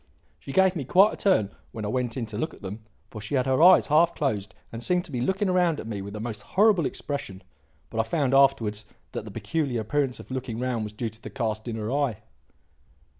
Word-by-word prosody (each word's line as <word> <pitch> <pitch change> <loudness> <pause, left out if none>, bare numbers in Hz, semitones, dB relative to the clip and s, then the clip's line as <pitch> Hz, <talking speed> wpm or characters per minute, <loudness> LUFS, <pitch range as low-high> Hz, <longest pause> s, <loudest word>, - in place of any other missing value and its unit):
She - - -8
gave 190 +3 +4
me 155 - -2
quite 190 - +5
a - - -4
turn 145 - +2 0.2
when 110 -2 -5
I - - -2
went 125 +1 -1
in 120 - -2
to 110 -1 -6
look 155 - -3
at - - -19
them, 100 +3 -6 0.3
for 105 - -7
she 110 +7 -3
had 130 -2 +2
her 130 +2 +2
eyes 180 +2 +8
half 165 +3 +3
closed 105 -9 -2 0.2
and 115 - -6
seemed 180 +7 +1
to 170 - -10
be 125 -3 -2
looking 190 - +1
round 175 -4 +2
at - - -6
me 105 -3 -4
with 100 +1 -7
a - - -5
most 110 -1 -5
horrible 200 -6 +3
expression; 100 -10 -5 0.5
but 115 - -3
I - - +4
found 140 -5 +1
afterwards 115 -6 +3 0.2
that - - -5
the - - -7
peculiar 140 -8 -2
appearance 135 +3 -1
of - - -12
looking 130 -3 -4
round 125 -3 -1
was 105 - -7
due 115 +2 -3
to 110 +1 -14
the - - -7
cast 110 -3 -3
in 115 - -3
her 110 +1 -3
eye." 140 -6 0
125 Hz, 240 wpm, -26 LUFS, 110-155 Hz, 0.5 s, eyes